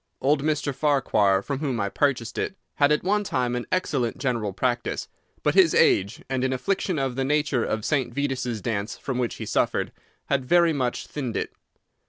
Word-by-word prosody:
Old 140 +2 +2
Mr. 150 -1 0
Farquhar, 110 -9 +2
from 140 +2 -3
whom 135 -6 -1
I 100 - 0
purchased 120 0 0
it, - - -2 0.2
had 145 0 +4
at 150 - +2
one 205 +3 +2
time 125 -9 -1
an 125 - -4
excellent 140 -10 0
general 115 -6 -1
practice; 120 +4 -1 0.4
but - - +2
his - - +5
age, 100 +1 +3
and 130 -1 -1
an 130 - +1
affliction 185 +6 -1
of 135 -3 -1
the 135 - 0
nature 145 -3 +1
of 110 0 -2
St. 130 -2 0
Vitus's 125 -4 -2
dance 105 -2 -2
from 130 -2 -3
which 120 -2 -1
he - - -6
suffered, - - 0 0.3
had 140 -2 0
very 170 +4 +4
much 125 -4 -1
thinned 130 -6 -4
it. - - -3
130 Hz, 190 wpm, -25 LUFS, 120-145 Hz, 0.4 s, his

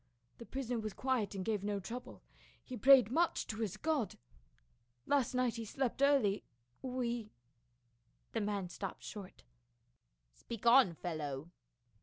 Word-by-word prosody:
The 235 - -9
prisoner 250 -3 -2
was 215 -2 -4
quiet 255 -6 0
and 190 -1 -3
gave 210 -3 0
no 205 0 -1
trou 230 +6 -5
ble; - - -14 0.4
he 255 - -7
prayed 255 -3 +7
much 335 +5 +2
to 220 - -5
his 210 -3 -2
God. 300 -4 0 0.9
Last 275 -3 +2
night 250 -2 +1
he 230 - -3
slept 265 +3 -2
early; 270 -8 +4 0.4
we 240 -4 -2 0.3
— 120 -1 -43
" 120 0 -42
The 225 - 0
man 205 -3 -1
stopped 195 +2 -6
short. 200 -3 -9 0.9
"Speak 230 - -8
on, 235 -7 +7
fellow." 155 -2 -4
225 Hz, 150 wpm, -35 LUFS, 195-255 Hz, 0.9 s, prayed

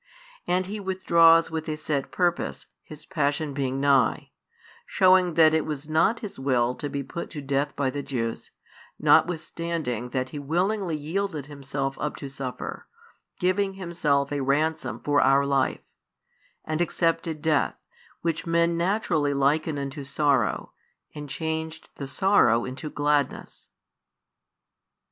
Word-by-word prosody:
And 180 +1 +1
He 210 +3 -5
withdraws 170 -4 +4
with 160 0 -4
a 155 - -2
set 150 -3 -2
purpose, 175 -2 -1 0.2
His 155 0 -12
Passion 150 -3 -1
being 135 -1 -2
nigh; 135 -4 +2 0.6
shewing 185 -2 +4
that 160 -1 +6
it 160 -1 +2
was 150 -1 -5
not 160 +9 +2
His 205 -10 -7
will 125 -2 +1
to 145 - -5
be 140 0 -3
put 170 +6 -6
to 155 - -7
death 140 +1 -1
by 140 -3 0
the 145 - -4
Jews, 115 -5 -4 0.5
notwithstanding 165 -7 +1
that 130 0 -2
He 145 - -6
willingly 175 +4 0
yielded 160 0 -3
Himself 135 -1 -4
up 150 - -2
to 140 - -7
suffer, 135 -2 -6 0.5
giving 195 +2 +1
Himself 165 -7 0
a 145 -1 -1
Ransom 155 +4 0
for 145 0 +3
our 135 +1 +4
life; 140 -1 +1 0.8
and 155 +1 -1
accepted 165 -2 0
death, 155 -1 +1 0.5
which 165 +1 -2
men 170 0 +2
naturally 170 -5 0
liken 145 +3 +1
unto 140 +1 -5
sorrow, 140 +1 0 0.4
and 145 -1 -8
changed 160 +1 -4
the 140 - -5
sorrow 135 - +3
into 130 +4 -6
gladness. 145 0 -1
150 Hz, 135 wpm, -26 LUFS, 140-170 Hz, 0.8 s, that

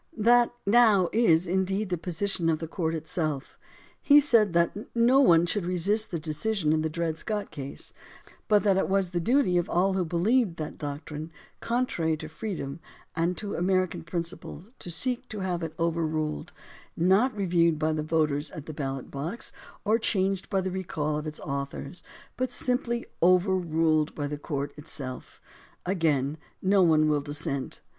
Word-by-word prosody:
That 240 +2 +4
now 210 -4 +5
is, 180 -7 +4
indeed, 190 +3 0
the 180 - 0
position 180 0 -1
of 160 - +2
the 165 - -6
court 165 0 -2
itself. 155 -3 -3 0.4
He 290 0 +7
said 230 - +4
that 170 0 +2 0.2
no 240 +3 +5
one 170 -11 +6
should 195 +2 -1
resist 185 +5 +2
the 170 - -2
decision 155 +2 0
in 155 - +1
the 160 - -1
Dred 165 -1 -2
Scott 210 0 -3
case, 140 -1 -6 0.5
but 210 -1 +4
that 195 -3 +3
it 195 - 0
was 195 -2 +1
the 175 - -1
duty 225 -2 +2
of 175 - -3
all 190 +3 +2
who 190 -1 +1
believed 180 +4 +1
that 155 - -6
doctrine 150 +2 -6 0.3
contrary 205 -10 0
to 155 0 -7
freedom 160 -4 -5 0.4
and 170 +2 0
to 205 -1 -5
American 185 0 0
principles 170 +3 -5
to - - -7
seek 245 +9 +1
to 210 -2 -5
have 180 -2 -2
it 160 -1 -5
overruled 160 - -1 0.3
— - - -30
not 200 +8 +3
reviewed 170 -4 +2
by 155 +1 0
the 155 - -1
voters 155 -1 0
at 155 - -9
the 155 - -7
ballot 135 -3 -5
box, 160 - -3 0.3
or 220 +2 +3
changed 195 -3 0
by 195 - +1
the 185 0 -3
recall 155 -5 -2
of 150 - -6
its 155 - -6
authors, 140 +3 -5 0.4
but 255 -1 -1
simply 245 -1 -1 0.2
overruled 170 -4 +2
by 145 - -3
the 145 0 -4
court 140 -2 -4
itself. 135 -4 -5 0.5
Again, 155 -5 0 0.2
no 195 +1 +3
one 155 -3 +4
will 150 -1 +2
dis 145 +1 -1
sent. 140 -3 -3
170 Hz, 170 wpm, -27 LUFS, 155-195 Hz, 0.5 s, He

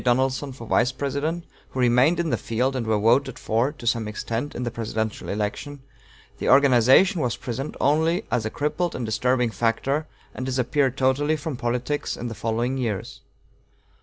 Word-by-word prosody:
Donelson 130 +2 +1
for 125 -3 -10
Vice 125 +3 +2
President, 140 +5 -2 0.2
who 130 - -6
remained 125 +7 +4
in 165 -3 0
the - - +3
field 125 +4 -1
and 120 -3 -2
were 110 -1 +2
voted 125 +5 +2
for, 115 +5 0
to 130 - -12
some 115 -1 +1
extent, 115 +5 -4
in 125 - -3
the 120 - -2
presidential 110 -1 -3
election, 110 +7 -4 0.6
the - - -1
organization 140 - +5
was 120 -4 -1
present 130 +3 -5
only 160 +7 +2
as 115 - +1
a 110 - -2
crippled 150 +7 -2
and 125 - -3
disturbing 120 +2 +1
factor, 120 +8 0 0.3
and 130 - -5
disappeared 130 +1 0
totally 140 +4 +2
from 155 -1 -4
politics 125 +4 -2
in 120 - -4
the - - -5
following 115 +4 -1
years. 110 -6 -3
125 Hz, 170 wpm, -24 LUFS, 115-140 Hz, 0.6 s, organization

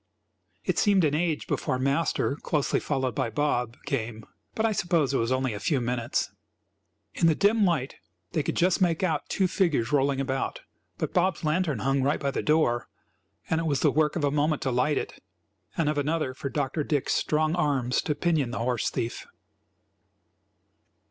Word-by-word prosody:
It - - +1
seemed 200 -4 +4
an 150 -2 +2
age 160 0 0
before 130 - -1
Master, 140 +2 0
closely 150 -2 0
followed 130 -4 -1
by 115 - -1
Bob, 120 -2 -1
came; 110 -5 -3 0.3
but 220 - +1
I 225 - +2
suppose 170 -8 +1
it - - +2
was 115 +2 0
only 130 -2 0
a 105 - -5
few 135 +6 +1
minutes. 120 -1 -1 0.8
In 165 - +2
the 160 - +4
dim 210 +3 +3
light 155 -7 0 0.3
they 160 - 0
could - - -2
just 180 +2 +2
make 170 -1 +2
out 160 -5 -1
two 190 -2 +2
figures 155 - +1
rolling 140 -1 +2
about, 135 0 -2 0.4
but - - -3
Bob's 180 0 +1
lantern 155 -2 +1
hung 135 +4 +1
right 140 +3 +1
by 140 -1 -1
the - - -2
door 150 -6 +2 0.6
and 160 0 +1
it 165 - -2
was 140 -3 0
the 150 - +4
work 150 0 +1
of 170 - -2
a 140 - +2
moment 150 +1 +1
to 130 - 0
light 125 +5 +1
it, - - -5 0.6
and 165 - +1
of 150 -1 +1
another 150 -2 -1
for 140 +1 -5
Dr. 145 +3 -1
Dick's 145 -2 0
strong 155 +1 +1
arms 140 -7 +1
to 150 - -1
pinion 155 -7 +1
the 125 - -4
horse 120 0 0
thief. 115 - -4
145 Hz, 185 wpm, -27 LUFS, 130-165 Hz, 0.8 s, seemed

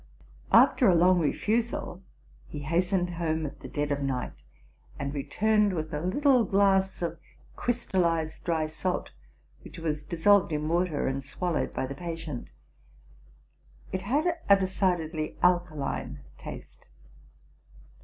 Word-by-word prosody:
After 250 - +6
a 185 - +5
long 180 +2 +5
refusal, 210 +3 -1 0.5
he 150 - -7
hastened 175 +4 0
home 160 -2 -1
at 145 - -7
the - - -9
dead 145 0 -2
of 140 0 -1
night, 130 -2 -3 0.6
and 140 0 -4
returned 210 +8 +1
with 155 -2 -4
a 150 - -2
little 255 - +3
glass 195 -2 +2
of 170 -1 -3 0.4
crystallized 170 -9 -1
dry 165 -3 0
salt, 160 +4 -3 0.5
which - - -11
was 155 -2 -2
dissolved 175 +5 +3
in 150 0 -1
water, 170 -2 0
and 135 +1 -2
swallowed 170 +5 -2
by - - -2
the 135 - -5
patient. 165 -4 -6 1.4
It 185 - -2
had 305 - 0
a 200 - +9
decidedly 180 -5 -1
alkaline 175 -5 0
taste. - - -10
170 Hz, 125 wpm, -28 LUFS, 155-190 Hz, 1.4 s, a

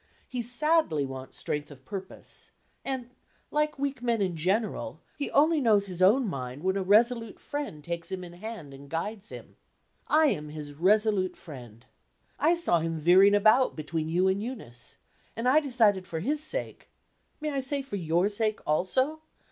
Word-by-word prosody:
He 250 -1 -3
sadly 245 - +2
wants 130 -1 -8
strength 150 0 -3
of 135 -3 -14
purpose; 190 -2 -6 0.3
and, 255 -3 -4 0.4
like 300 0 0
weak 275 -2 -2
men 235 -2 +1
in 185 -4 0
general, 195 +7 -1 0.2
he 285 - -3
only 310 +1 +4
knows 210 -5 +4
his 185 -2 -6
own 220 +7 +5
mind 130 -3 -5
when 190 +1 +1
a 195 - 0
resolute 225 +3 +3
friend 285 - -5
takes 170 +1 -5
him 185 -1 -4
in 175 -1 -10
hand 180 -6 -8
and 140 +1 -12
guides 205 +6 -4
him. - - -11 0.5
I 310 +1 +5
am 150 - -3
his 150 -1 -7
resolute 195 +3 +2
friend. 125 - -11 0.5
I 330 +3 +4
saw 340 - +3
him 165 0 -2
veering 185 +6 +6
about 215 +5 +4
between 155 +1 -3
you 180 +3 +2
and 190 +1 +1
Eunice; 125 - -7 0.4
and 230 +2 -2
I 275 +5 +6
decided 225 -10 +2
for 160 - -4
his 295 - -1
sake 405 +11 -4 0.5
may 305 -1 -2
I 275 - -1
say 275 +1 -2
for 265 -6 -6
your 170 +2 +1
sake 215 +1 0
also? 260 - +1
200 Hz, 170 wpm, -28 LUFS, 165-255 Hz, 0.5 s, veering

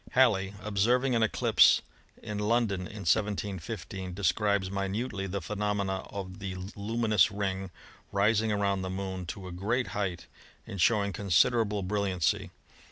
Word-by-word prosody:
Halley, 100 -6 +3
observing 120 +6 +2
an 115 - +2
eclipse 110 - +5 0.4
in 105 -1 -4
London 105 -4 +1
in 105 -2 -8
171 100 +1 +1
5, 95 -1 -6
describes 100 0 +1
minutely 100 +1 -2
the 100 +1 -3
phenomena 100 0 -1
of 95 -1 -7
the 95 -2 -5 0.2
luminous 110 -1 +2
ring 95 -1 -3 0.4
rising 105 +2 +2
around 100 -2 +1
the 95 - -3
Moon 95 -1 -4
to 95 +1 -6
a - - -7
great 110 +8 -1
height, 95 -4 -3 0.4
and 100 - -5
showing 100 0 +3
considerable 105 +3 +2
brilliancy. 95 -3 0
100 Hz, 135 wpm, -29 LUFS, 95-105 Hz, 0.4 s, eclipse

